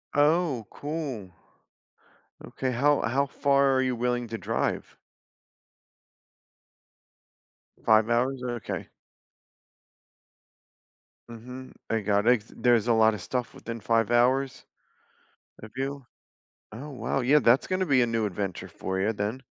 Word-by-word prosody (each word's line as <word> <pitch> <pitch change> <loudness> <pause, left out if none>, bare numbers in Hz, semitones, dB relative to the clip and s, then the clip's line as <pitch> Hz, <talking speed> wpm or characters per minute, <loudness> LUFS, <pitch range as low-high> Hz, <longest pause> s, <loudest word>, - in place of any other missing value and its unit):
Oh, 145 -5 +2
cool. 145 - -5 1.1
Okay. 130 -1 -3
How 140 +4 +2
how 140 +4 +1
far 140 0 +2
are 130 - +3
you 130 -1 0
willing 120 0 -1
to 115 - -5
drive? - - -2 2.9
5 110 0 +5
hours? 125 +2 +1
Okay. 120 -3 -4 2.4
Mhm. 125 +3 -10 0.2
I 115 - +2
got 105 +2 +1
ex 115 -3 +2
there's 120 -2 +3
a 120 - +4
lotta 110 -2 +3
stuff 125 +5 -3
within 115 0 -7
5 115 +1 +1
hours? 130 +3 +2 1.0
Have 110 0 -10
you 135 0 -4 0.7
Oh 130 +8 -8
wow, 125 0 -2
yeah, 140 +5 +4
that's 120 -1 +4
gonna 185 0 0
be 135 -5 +3
a 120 - +2
new 115 -1 0
adventure 95 -2 -4
for 95 0 -4
you 105 +4 +1
then. 105 +6 -3
120 Hz, 120 wpm, -27 LUFS, 110-135 Hz, 2.9 s, 5